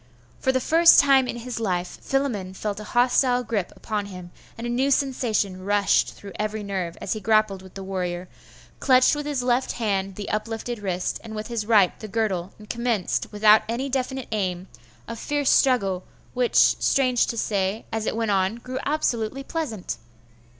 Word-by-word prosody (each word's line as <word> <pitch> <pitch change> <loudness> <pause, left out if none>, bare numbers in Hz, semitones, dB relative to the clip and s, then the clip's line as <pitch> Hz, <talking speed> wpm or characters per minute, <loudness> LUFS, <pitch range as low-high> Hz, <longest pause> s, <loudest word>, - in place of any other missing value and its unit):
For 265 - +2
the 260 - +1
first 330 +5 +6
time 270 -2 +5
in - - -3
his 240 0 -5
life 180 -5 -2
Philammon 225 -9 -2
felt 205 +1 -3
a - - -7
hostile 245 +2 +2
gripe 215 -5 -2
upon 210 -2 -3
him, 180 -3 -10 0.3
and 230 - -6
a - - -2
new 260 +3 +1
sensation 230 -9 0
rushed 205 0 +2
through 200 - -10
every 215 0 -2
nerve, 190 -4 -4
as - - -2
he 215 - -4
grappled 215 -2 +2
with 190 -1 -15
the 195 - -6
warrior, 180 -2 -3 0.5
clutched 255 +1 +4
with 295 0 -4
his 280 -4 -1
left 250 +1 +1
hand 195 -4 -1
the 205 0 -6
up 215 +1 -1
lifted 225 +1 -5
wrist, 185 -3 -2
and 220 -1 -8
with 215 +1 -5
his 225 -3 -3
right 205 -5 +4
the 215 - -7
girdle, 195 -4 -1
and 210 - -14
commenced, 235 -4 -1
without 210 +1 +6
any 255 +4 -2
definite 265 -1 -2
aim, 185 -4 -2 0.4
a - - -5
fierce 290 +4 0
struggle, 195 -9 +2 0.3
which, 250 -1 0
strange 255 -3 +4
to 230 - -3
say, 200 0 -1
as 220 -1 -2
it - - -1
went 225 -2 0
on, 190 +2 +1
grew 255 +2 -6
absolutely 270 -4 -1
pleasant. 270 - -4
220 Hz, 185 wpm, -24 LUFS, 195-250 Hz, 0.5 s, first